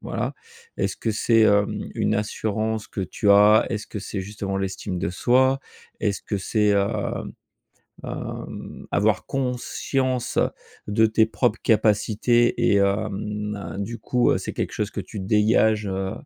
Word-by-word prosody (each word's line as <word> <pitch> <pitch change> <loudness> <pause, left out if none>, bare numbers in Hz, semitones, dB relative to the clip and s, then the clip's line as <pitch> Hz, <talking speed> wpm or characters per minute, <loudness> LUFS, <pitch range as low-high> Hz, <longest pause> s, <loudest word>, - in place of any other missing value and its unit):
voilà. - - -3 0.4
Est-ce - - -1
que 115 - -2
c'est, 115 +2 +2
hem, 105 -1 +2
une 110 - +1
assurance 110 +1 -2
que - - -6
tu 100 +2 -2
as? 105 +2 +6
Est-ce 110 -4 -4
que 105 - -5
c'est 100 -1 -5
justement 100 0 -4
l'estime 95 -1 -3
de 95 - -1
soi? 130 +7 +3 0.4
Est-ce 100 -2 -1
que 100 - -3
c'est, 105 +2 0
hem 100 0 0 0.7
hem, - - -7
avoir 105 -2 +2
conscience 130 0 -2 0.5
de 110 +2 +3
tes 110 0 +3
propres 110 0 0
capacités 110 +2 +3 0.2
et - - +4
hem 105 +1 -1
heu, 100 -1 -7
du 115 +3 -5
coup, 125 0 +1
heu, - - +2
c'est - - -5
quelque - - -3
chose 105 -1 -2
que - - -5
tu 95 +1 -6
dégages, 110 +1 +3
heu 95 0 -2
105 Hz, 150 wpm, -24 LUFS, 100-110 Hz, 0.7 s, as